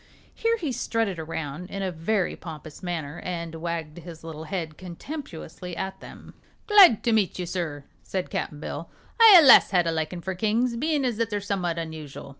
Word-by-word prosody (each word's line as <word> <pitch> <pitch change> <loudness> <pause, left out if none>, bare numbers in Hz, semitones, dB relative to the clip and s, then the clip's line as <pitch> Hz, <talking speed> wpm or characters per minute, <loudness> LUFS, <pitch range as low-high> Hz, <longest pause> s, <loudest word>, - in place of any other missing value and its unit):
Here 460 0 0
he 315 -10 -3
strutted 225 -7 -1
around 160 +1 -5
in 195 0 -4
a 190 - -1
very 180 +4 -1
pompous 155 -2 -10
manner 165 -4 -4
and 170 -2 -5
wagged 165 -1 -5
his 165 -1 -11
little 160 -1 -7
head 165 -3 -4
contemptuously 180 - -8
at 190 0 -4
them. - - -12 0.3
"Glad 395 - +7
to 235 - +2
meet 210 -4 +1
you, 180 - -3
sir," 165 -5 -4 0.2
said 185 -1 -4
Cap'n 150 - -3
Bill. - - -6 0.3
"I 450 -3 +10
allus 295 -6 +8
had 180 -3 +2
a 165 - +1
likin' 160 +2 -3
for 190 +2 -3
kings, 225 +5 0
bein' 295 +2 0
as 240 -4 -1
they're 220 -2 -1
summat 190 -4 -2
unusual. 160 -4 -7
180 Hz, 180 wpm, -25 LUFS, 160-220 Hz, 0.3 s, I